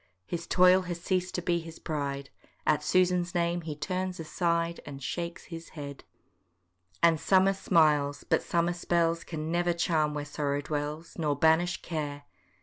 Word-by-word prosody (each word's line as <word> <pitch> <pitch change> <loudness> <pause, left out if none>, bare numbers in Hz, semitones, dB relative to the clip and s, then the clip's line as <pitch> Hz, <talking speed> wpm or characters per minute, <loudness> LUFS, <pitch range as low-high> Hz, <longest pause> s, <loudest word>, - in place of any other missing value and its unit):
His 170 - -5
toil 185 +1 +6
has 175 -1 -3
ceased 185 +1 -1
to 180 - -2
be 170 0 +1
his 165 0 -9
pride, 140 -3 -4 0.3
At 150 - +3
Susan's 180 +1 +2
name 170 0 +1
he 160 -2 -5
turns 185 +4 -3
aside, 170 +1 0
And 140 -1 -8
shakes 170 +5 -4
his 165 -1 -9
head. 140 -1 -7 1.0
And 165 -2 +5
summer 190 +3 +4
smiles, 150 -6 +2
but - - +2
summer 170 +1 +1
spells 170 -1 +1
Can 160 -1 -4
never 175 0 +2
charm 155 -3 +1
where 145 -1 -3
sorrow 145 -1 -2
dwells, 150 +3 -4
Nor 150 -3 +1
banish 160 +4 +3
care. 145 -4 -4
165 Hz, 155 wpm, -29 LUFS, 150-175 Hz, 1.0 s, toil